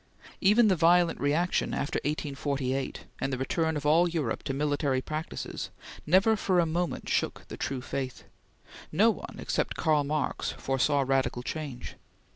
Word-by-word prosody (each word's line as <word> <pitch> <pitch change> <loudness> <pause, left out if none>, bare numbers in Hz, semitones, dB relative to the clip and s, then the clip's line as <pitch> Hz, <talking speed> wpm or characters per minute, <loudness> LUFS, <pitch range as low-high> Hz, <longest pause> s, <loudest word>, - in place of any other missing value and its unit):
Even 215 +4 +5
the 190 - +4
violent 170 +1 +4
reaction 155 +6 +1
after 145 - -1
1848, 140 -3 -2 0.2
and 135 - -1
the 130 - -1
return 160 +4 0
of 145 - -5
all 165 +4 +5
Europe 155 -9 -2
to 140 - -3
military 145 -1 0
practices, 155 +4 -5 0.4
never 190 +7 +5
for 190 -3 +1
a 170 - +4
moment 170 +2 -2
shook - - -1
the - - -6
true 130 -2 -3
faith. 130 0 -4 0.7
No 215 +8 +5
one, - - -8
except - - -1
Karl 155 -3 +2
Marx, 150 +1 -1
foresaw 135 +2 +1
radical 130 -2 0
change. 140 -4 -6
150 Hz, 150 wpm, -29 LUFS, 135-170 Hz, 0.7 s, Even